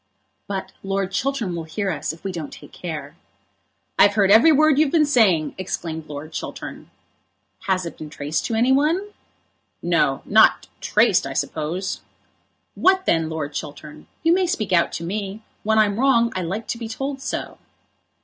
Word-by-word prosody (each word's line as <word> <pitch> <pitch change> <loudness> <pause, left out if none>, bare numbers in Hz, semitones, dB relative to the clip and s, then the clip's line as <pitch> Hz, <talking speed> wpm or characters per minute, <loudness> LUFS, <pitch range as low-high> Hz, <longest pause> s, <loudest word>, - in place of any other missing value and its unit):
But 195 -1 -4
Lord 195 0 -2
Chiltern 235 -4 -1
will 165 -1 -5
hear 195 +5 -2
us 150 -3 -3
if 160 - -13
we 195 - -3
don't 165 -5 -6
take - - -13
care." - - -6 0.8
"I've 205 0 +6
heard 200 -2 +4
every 230 +10 +7
word 305 -1 +4
you've 305 -3 +3
been 315 -3 +4
saying," 205 - +3
exclaimed 165 -4 -4
Lord 150 +2 -8
Chiltern. - - -7 0.8
"Has 185 -2 +1
it 170 - -8
been 155 - -7
traced 150 +1 -3
to 225 - -2
any 240 +4 +3
one?" 320 +9 +2 0.7
"No, - - +1
not - - +5
traced, - - +3
I - - -5
suppose." 175 +5 -3 0.7
"What 375 0 +3
then, 165 -1 +2
Lord 155 -2 -4
Chiltern? 150 0 -8 0.2
You 330 +1 +5
may 370 0 +2
speak 215 - -1
out 170 -1 +3
to 165 - -4
me. 200 +3 -4 0.2
When 220 +1 +1
I'm 210 0 +3
wrong 235 -3 +3
I 185 - -1
like 190 +6 -3
to 230 - -3
be 230 - -5
told 270 +4 -4
so." - - -4
195 Hz, 170 wpm, -22 LUFS, 165-265 Hz, 0.8 s, every